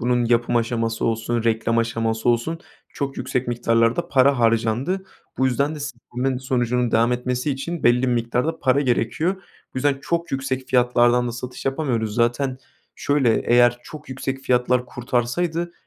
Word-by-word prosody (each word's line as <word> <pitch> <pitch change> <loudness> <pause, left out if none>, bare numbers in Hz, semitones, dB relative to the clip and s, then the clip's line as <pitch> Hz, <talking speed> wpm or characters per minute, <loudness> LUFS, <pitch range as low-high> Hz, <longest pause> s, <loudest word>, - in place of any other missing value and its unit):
bunun 120 0 +1
yapım 120 0 +2
aşaması 115 -1 -1
olsun, 115 0 -1
reklam 115 0 +1
aşaması 115 0 -1
olsun 120 +8 +1 0.3
çok 140 -1 -4
yüksek 125 0 -2
miktarlarda 115 -1 +1
para 135 0 +4
harcandı. 115 - +1 0.3
Bu 130 - +3
yüzden 140 +4 0
de 150 - -8
s 135 -4 -6
bunların 125 +1 -1
sonucunun 125 -2 0
devam 115 +2 +3
etmesi 125 +3 -1
için 150 +5 -4
belli 120 +1 +4
bir - - +2
miktarda 120 +6 -1
para 135 +1 +2
gerekiyor. 140 +8 0 0.4
Bu - - -2
yüzden 140 0 +1
çok 170 0 -2
yüksek 130 -1 -2
fiyatlardan 120 -1 +3
da - - -4
satış 125 +1 -7
yapamıyoruz. 125 -7 -1
Zaten 125 +2 0 0.4
şöyle, 135 -6 +2
eğer 120 0 +4
çok 155 -2 -11
yüksek 135 0 -4
fiyatlar 125 -1 +1
kurtarsaydı 145 +9 -2
125 Hz, 155 wpm, -22 LUFS, 120-135 Hz, 0.4 s, para